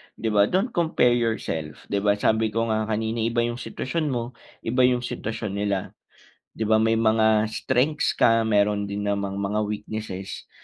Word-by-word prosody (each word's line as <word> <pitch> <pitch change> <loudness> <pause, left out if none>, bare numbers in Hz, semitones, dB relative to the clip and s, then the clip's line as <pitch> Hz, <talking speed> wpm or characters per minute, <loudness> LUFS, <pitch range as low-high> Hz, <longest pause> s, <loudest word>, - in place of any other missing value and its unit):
di 115 - -2
ba? 105 -1 +4
Don't 195 +7 0
compare 160 - +2
yourself 110 -10 -2
di 100 - +1
ba? 100 0 +2
Sabi 110 +2 +2
ko 115 +1 -1
nga 110 0 0
kanina 110 +1 -1
iba 115 +1 +1
yung 120 +1 -3
sitwasyon 155 +5 -3
mo, 120 -2 -2 0.3
iba 125 +3 +1
yung 125 -1 +1
sitwasyon 110 -3 -4
nila, 100 -2 -1 0.7
di 110 - -1
ba? 110 0 +3
May 115 0 +2
mga 110 -1 +3
strengths 130 +7 0
ka 115 0 +4
mayro'n 105 -2 +1
din 100 0 -3
namang 100 -1 -1
mga 100 +2 -1
weaknesses. 105 -2 -6
110 Hz, 170 wpm, -24 LUFS, 105-120 Hz, 0.7 s, ba